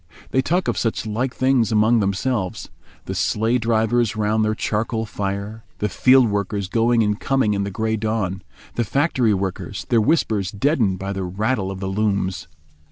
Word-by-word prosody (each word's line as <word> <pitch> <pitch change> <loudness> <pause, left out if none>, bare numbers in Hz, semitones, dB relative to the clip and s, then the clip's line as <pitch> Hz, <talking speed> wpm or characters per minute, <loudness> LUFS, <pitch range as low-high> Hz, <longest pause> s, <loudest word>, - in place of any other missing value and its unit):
They 130 - +3
talk 175 +7 0
of - - 0
such 115 -1 -1
like 115 +4 -1
things 130 -4 +2
among 110 +2 +4
themselves: 100 0 -1 0.4
the - - -4
sleigh 115 +3 +1
drivers 115 0 +1
round 110 +1 +1
their 110 0 0
charcoal 110 +1 -1
fire, 100 +1 -4
the 105 - -1
field 130 +6 +5
workers 100 -1 -2
going 115 +3 +2
and 105 0 0
coming 135 -6 +1
in 100 -1 -1
the - - -3
grey 110 +3 -1
dawn, 105 -4 -2 0.3
the 120 - 0
factory 130 -3 +1
workers, 95 -1 -4
their 115 -2 +4
whispers 110 - +1
deadened 105 - +1
by 95 +1 -4
the 95 -1 -3
rattle 100 +3 -1
of 95 -1 -6
the 95 - -2
looms. 95 -3 -1
110 Hz, 170 wpm, -21 LUFS, 100-120 Hz, 0.4 s, field